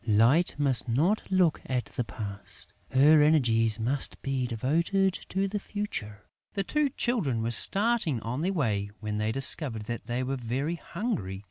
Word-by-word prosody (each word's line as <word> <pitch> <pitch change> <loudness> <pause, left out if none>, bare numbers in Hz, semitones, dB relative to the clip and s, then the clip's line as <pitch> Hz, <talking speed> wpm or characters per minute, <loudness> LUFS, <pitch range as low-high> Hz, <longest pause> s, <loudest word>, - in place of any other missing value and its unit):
"Light 115 +11 +3
must 135 -4 +1
not 165 - +2
look 185 -4 +2
at 125 -2 -1
the 125 - 0
past. 100 -3 -9 0.2
Her 150 +3 +5
energies 115 -8 +3
must 130 +5 -2
be 135 -2 -1
devoted 170 - +1 0.2
to 195 +1 0
the 205 +1 -3
future!" 110 - -5 0.3
The 195 - 0
two 300 +7 0
Children 180 - -1
were 115 - -1
starting 195 - +2
on 120 +6 -4
their 185 +4 0
way, 105 - -1
when 105 0 -3
they 110 +1 0
discovered 135 -2 +3
that 115 +2 -6
they 120 +2 -2
were 135 +1 -2
very 130 +8 -3
hungry. 165 - -4
135 Hz, 160 wpm, -28 LUFS, 115-175 Hz, 0.3 s, Her